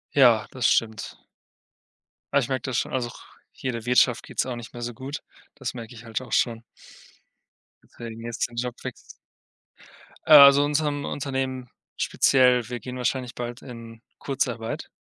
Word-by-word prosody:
Ja, 120 -6 +5
das 130 -3 -3
stimmt. 110 -2 0 1.2
Ah, 140 - +5
ich 135 - -2
merke 130 -2 -1
das 130 -3 -2
schon - - -2
auch. 120 -3 -3 0.4
Hier 130 - -2
der 115 -2 -6
Wirtschaft 125 -1 +3
geht - - -11
es - - +3
auch 130 -2 -4
nicht 120 0 -9
mehr 120 - -8
so 120 0 -4
gut. 135 +5 -6 0.4
Das - - -5
merke 120 -1 -8
ich 115 -1 -12
halt 115 +1 -4
auch 130 - -8
schon. 115 -1 +1 1.3
Deswegen 115 -1 -8
jetzt 120 0 -2
den 120 - -14
Job 120 0 -3
wechs - - -3 1.4
Äh, - - 0
also 140 -1 +10
in - - +3
unserem 145 -1 0
Unternehmen 130 -2 -3 0.3
speziell. 125 -3 +3
Wir 125 -1 -4
gehen 125 +1 -7
wahrscheinlich 125 0 -2
bald 120 0 -5
in 115 -3 -10 0.2
Kurzarbeit. 120 -4 -3
125 Hz, 170 wpm, -25 LUFS, 115-130 Hz, 1.4 s, also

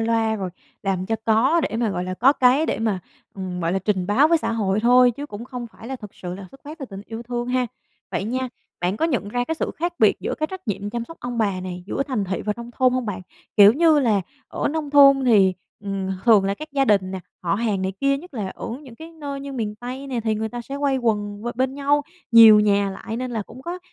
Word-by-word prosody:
loa 225 -1 +1
rồi 190 -3 -4 0.3
làm 190 -2 -1
cho 225 - 0
có 245 +9 +3
để - - -4
mà, 230 -2 0
gọi 180 -2 -2
là, 185 0 -4
có 255 +8 +5
cái 270 +3 +3
để - - -1
mà, 220 -4 0 0.4
ừm, 185 -2 -5
gọi 165 0 0
là, 190 - +1
trình 190 -2 -1
báo 255 +10 +4
với 335 0 +4
xã 305 - -2
hội 205 -2 0
thôi 245 +2 +6
chứ 280 +5 -7
cũng 215 -3 -8
không 245 -1 -6
phải 225 0 -13
là 265 - -4
thực 210 -5 -11
sự 180 -1 -6
là 190 0 -9
xuất 270 - -16
phát 305 +3 -9
từ 280 - -5
tình 195 -6 -9
yêu 225 +1 -6
thương 240 0 -4
ha. 250 0 +1 0.4
Vậy - - -2
nha, 255 +4 -2 0.3
bạn 180 +3 0
có 320 - 0
nhận 255 -11 0
ra 245 +3 -1
cái 320 - -2
sự - - -2
khác 345 +2 -1
biệt - - +5
giữa - - -2
cái 310 - -1
trách 375 -7 -9
nhiệm 205 0 -3
chăm 235 +1 -3
sóc 330 +7 -12
ông 245 -1 -4
bà 200 -4 0
này 180 -1 -6
giữa 240 - -1
thành 255 -8 -2
thị 190 0 -3
và 210 - -1
nông 235 0 -8
thôn 255 +1 +2
hông 255 -2 -1
bạn? 205 -2 -3 0.4
Kiểu 205 0 +9
như 315 +2 +4
là 225 -7 +2 0.3
ở - - -2
nông 300 -1 -3
thôn 275 -2 +7
thì, 200 -6 +5 0.3
ừm, 195 -2 -3 0.2
thường 220 -5 +6
là 195 0 0
các 310 +8 -9
gia 275 -1 +2
đình 195 -6 +2
nè, 190 -1 -5 0.2
họ 170 0 +1
hàng 205 -3 -1
này 190 0 -1
kia 275 0 +3
nhất 345 0 -13
là 210 -5 -3
ở - - -7
những 255 -5 -12
cái 320 +6 -11
nơi 285 -3 -6
như 280 0 -7
miền 220 -5 -3
Tây 250 +5 -7
nè, 255 -3 -2
thì 220 -1 0
người 220 +1 -2
ta 240 +2 -6
sẽ 275 +4 -6
quây 280 -2 +1
quần 210 -4 -1
b - - -7
bên 260 +2 0
nhau 285 +1 +2 0.3
nhiều 225 -2 +9
nhà 200 -1 +2
lại 225 +3 -6
nên 255 +1 -3
là 225 -3 -2
cũng 240 +6 -13
có, 345 +4 -5
230 Hz, 270 wpm, -23 LUFS, 205-270 Hz, 0.4 s, Kiểu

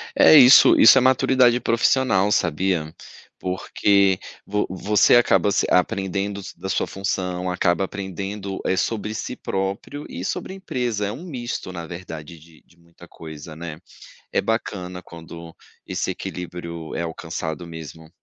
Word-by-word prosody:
É - - +7
isso. 130 -3 +8
Isso 115 +4 +8
é - - +5
maturidade 130 -1 +4
profissional, 115 -4 +2
sabia? 85 -2 0 0.5
Porque 95 +1 +1 0.3
vo 105 +1 -1
você 100 +5 +3
acaba 100 -5 +3
se 100 - +1
aprendendos 100 +1 -1
da 95 - -7
sua - - 0
função, 90 -2 -3
acaba 90 +1 +1
aprendendo, 95 0 -6
eh, 95 - +1
sobre 105 +2 -2
si 115 +3 -5
próprio 100 +9 -4
e 90 - -6
sobre 190 - -4
a - - -8
empresa. 120 - -3
É - - -3
um 150 +10 -8
misto, 120 - -5
na 85 -2 -7
verdade 85 -2 -9
de 80 0 -19
de 85 - -27
muita 85 0 -18
coisa, 80 -1 -10
né? 80 -1 -8 0.5
É - - +2
bacana 90 -5 -3
quando 85 0 -11 0.3
esse - - -2
equilíbrio 85 -2 -7
é - - -2
alcançado 80 0 -5
mesmo. 80 -1 -10
95 Hz, 145 wpm, -22 LUFS, 85-105 Hz, 0.5 s, isso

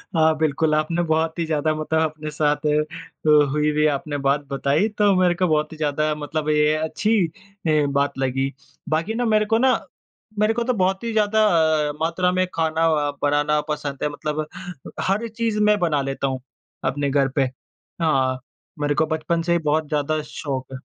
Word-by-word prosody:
हाँ, 160 0 +4
बिल्कुल 155 0 +1
आपने 160 +3 0
बहुत 160 +1 0
ही 165 - 0
ज़्यादा 155 0 0
मतलब 160 +1 0
अपने 155 -1 -3
साथ 150 0 0
अ, 150 0 +1
हुई-हुई 150 +1 +1
आपने 145 0 -2
बात 145 +2 +2
बताई। 140 +8 +1
तो 205 -2 +4
मेरे 180 -1 +4
को 185 0 +1
बहुत 155 -1 +1
ही 160 - -9
ज़्यादा 150 0 0
मतलब 150 +1 -3
ये 150 0 +3
अच्छी 160 +8 0
अ, 185 -5 -2
बात 140 0 0
लगी। 135 +1 -1 0.4
बाकी 165 +8 0
ना 245 - 0
मेरे 215 -1 +3
को - - +5
ना 260 +2 +4 0.7
मेरे 215 +1 +3
को 235 0 -1
तो 250 +1 0
बहुत 190 0 0
ही 230 - -2
ज़्यादा 215 0 +3 0.4
अ, 145 - -4
मात्रा 180 +3 +1
में 185 0 +1
खाना 160 0 +1 0.3
बनाना 145 +1 +2
पसंद 145 -2 -3
है। 150 - +1
मतलब 150 +1 -3 0.6
हर 215 +4 0
चीज़ 225 -1 -2
मैं 210 - +4
बना 155 -5 +1
लेता 135 0 -2
हूँ 130 -1 -3 0.5
अपने 140 +1 -1
घर 135 -1 +2
पे। 135 -3 +2 0.5
हाँ, 130 -5 +1 0.4
मेरे 145 0 0
को 155 - +2
बचपन 160 +1 -1
से 170 - +2
ही 170 - +3
बहुत 155 0 +1
ज़्यादा 150 +1 0
शौक 135 -3 -4
है। - - -4
155 Hz, 185 wpm, -22 LUFS, 145-175 Hz, 0.7 s, को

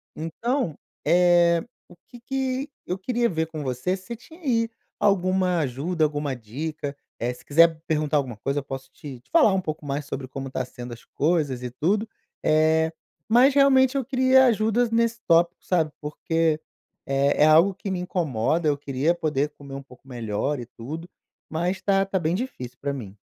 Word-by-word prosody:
Então, 170 - -2 0.3
eh, 175 0 +4 0.3
o 175 - -15
que 245 - -13
que 265 +2 -2 0.2
eu 180 - -2
queria 235 +4 0
ver 160 -2 -1
com 155 -2 -6
você, 130 +8 -1
se 215 +5 -8
tinha 320 +9 -16
aí 230 -6 +1 0.3
alguma 185 -2 +2
ajuda, 155 +5 -1
alguma 145 -2 -2
dica. 145 +6 -5 0.2
Eh, 120 +1 -1
se 125 - -17
quiser 165 +1 +4
perguntar 155 -1 +1
alguma 130 -5 -2
coisa, 140 +6 -1
eu - - -7
posso 135 -1 -7
te 135 -3 -9
te - - -34
falar 300 - +5
um 190 - +1
pouco 155 -3 -5
mais 140 +1 -3
sobre 135 -2 -5
como 135 +1 -6
está 130 - -2
sendo 120 -1 -9
as 115 - -12
coisas 145 -5 0
e 125 - -4
tudo, 200 - 0 0.4
eh, 160 +1 +3 0.4
mas 250 +5 +6
realmente 270 -1 +5
eu 270 - -1
queria 260 0 +5
ajudas 225 +1 +2
nesse 230 0 +1
tópico, 170 +1 +3
sabe? 165 -4 +1
Porque, 160 +1 0 0.5
eh, 140 +2 +2
é - - +8
algo 165 +6 +6
que 195 +1 -5
me 185 - -2
incomoda, 165 -4 0
eu 145 - +1
queria 140 +3 0
poder 150 -4 0
comer 140 -1 -9
um 140 - -7
pouco 130 0 -18
melhor 120 +3 -2
e 120 - -6
tudo. 150 +9 -8 0.4
Mas 175 +4 -1
tá 195 0 +2
tá 195 0 -1
bem 165 -1 0
difícil 130 - -5
para 140 0 -2
mim. 105 -8 -7
160 Hz, 185 wpm, -25 LUFS, 140-195 Hz, 0.5 s, é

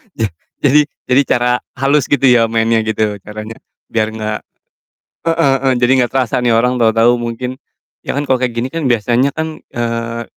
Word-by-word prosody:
Je 110 -2 -1 0.3
jadi 145 +1 +4 0.2
jadi 135 +3 +6
cara 125 0 +2 0.2
halus 135 +1 +1
gitu 140 -2 0
ya 120 -3 +5
mainnya 115 0 +1
gitu 105 -1 -1
caranya 110 +2 -9 0.3
biar 110 -1 +1
nggak 110 -1 -3 0.9
heeh 165 -4 +2
heeh, 130 - +4
jadi 120 +1 +3
nggak 120 - -4
terasa 130 -3 0
nih 120 - +3
orang 125 +2 +2
tahu-tahu 115 +1 +3
mungkin 120 +2 -4 0.5
ya - - -2
kan 145 0 -3
kalau 130 - +4
kayak 125 -1 -1
gini 120 +2 -2
kan 165 +1 -4
biasanya 120 +3 +2
kan, 160 +1 -4 0.2
eee, 115 0 -3
120 Hz, 175 wpm, -16 LUFS, 115-135 Hz, 0.9 s, jadi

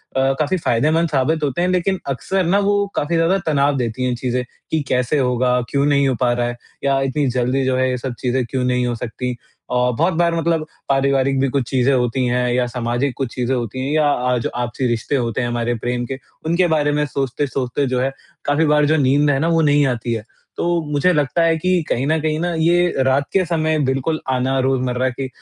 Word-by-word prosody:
अ, - - +2 0.2
काफ़ी 155 +5 +1
फ़ायदेमंद 155 +5 +1
साबित 150 +3 0
होते 145 +4 -1
हैं 180 - +1
लेकिन 185 +1 0
अक्सर 185 +8 -1
ना 195 +4 +3
वो 205 0 +2
काफ़ी 165 +3 0
ज़्यादा 165 +4 +3
तनाव 145 -2 +2
देती 120 +1 -2
हैं 125 -1 0
चीज़ें 125 0 -2 0.3
कि 160 -1 +1
कैसे 125 +4 +1
होगा, 125 -1 +1
क्यों 140 0 +1
नहीं 140 -1 +3
हो 130 - +1
पा 120 -1 +3
रहा 120 0 0
है 120 0 -5 0.3
या 135 -1 +2
इतनी 135 +1 0
जल्दी 125 +2 0
जो 130 - +1
है 130 0 +2
ये 125 - -1
सब 125 0 -4
चीज़ें 125 0 0
क्यों 130 +1 -2
नहीं 125 0 +1
हो 120 - -1
सकती? 125 +1 -4 0.3
औ 125 0 +2
बहुत 170 +4 +2
बार 170 0 +1
मतलब 165 -1 0 0.2
पारिवारिक 135 0 +2
भी 135 - +2
कुछ 135 0 0
चीज़ें 130 +1 +2
होती 125 0 +1
हैं 125 0 +1
या 125 0 +2
सामाजिक 120 +2 -2
कुछ 135 -4 -3
चीज़ें 125 +1 -1
होती 120 +1 -4
हैं 140 - -2
या 150 -2 +3
अ, 125 - -1
आज 120 - -1
आपसी 120 +1 -2
रिश्ते 120 +4 -1
होते 120 -1 -1
हैं 120 - -1
हमारे 120 0 -1
प्रेम 120 +1 -2
के 130 +2 -5 0.3
उनके 170 +2 +2
बारे 150 -2 +1
में 150 0 +1
सोचते-सोचते 135 0 -2
जो 125 0 0
है 135 +1 0 0.3
काफ़ी 145 +3 +2
बार 150 0 +3
जो 155 +2 +3
नींद 145 +1 +3
है 135 -1 +2
ना 160 - +1
वो 165 -1 +3
नहीं 145 -1 +4
आती 120 -1 -2
है। 110 -2 -3 0.3
तो 170 -1 +1
मुझे 150 +5 +3
लगता 150 +2 +1
है 165 -1 +3
कि 185 +1 +1
कहीं 130 +3 0
न 160 +1 +2
कहीं 155 0 -1
न 175 0 -1
ये 175 +2 +3
रात 130 +2 +2
के 190 -1 +3
समय 155 -2 0
बिल्कुल 135 +4 -1
आना 130 +1 0
रोज़मर्रा 130 -1 0
की 130 +2 -5
135 Hz, 225 wpm, -19 LUFS, 125-155 Hz, 0.3 s, नहीं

